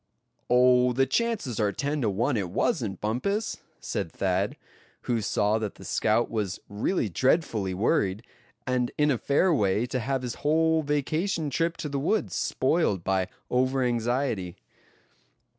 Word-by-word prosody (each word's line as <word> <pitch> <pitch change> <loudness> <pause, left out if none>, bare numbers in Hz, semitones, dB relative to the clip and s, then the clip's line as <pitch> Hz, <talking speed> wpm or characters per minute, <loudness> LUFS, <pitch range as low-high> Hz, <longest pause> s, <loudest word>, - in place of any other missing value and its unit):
"Oh! 125 0 +5
the 135 +2 +3
chances 200 - -1
are 105 -2 +2
ten 145 +5 -2
to 115 - +1
one 120 +7 0
it 100 -5 -1
wasn't, 110 - -1
Bumpus," 200 - -1 0.2
said 80 - -3
Thad, 95 +1 -1 0.5
who 120 -2 0
saw 105 0 +1
that 105 -2 -4
the - - -12
scout 110 +2 +1
was 105 -4 -2
really 110 - -1
dreadfully 110 - +1
worried, 100 - +1 0.4
and 125 -1 0
in 150 0 +3
a 125 - 0
fair 165 +6 +2
way 105 -3 +2
to 125 +1 -2
have 130 +2 -2
his 125 -1 -3
whole 160 +2 +3
vacation 155 +3 -1
trip 165 +4 0
to - - -4
the 140 -1 -2
woods 205 +10 0
spoiled 130 - +1
by 95 -1 +1 0.2
over 130 +1 +2
anxiety. 120 -6 -1
125 Hz, 150 wpm, -27 LUFS, 105-150 Hz, 0.5 s, Oh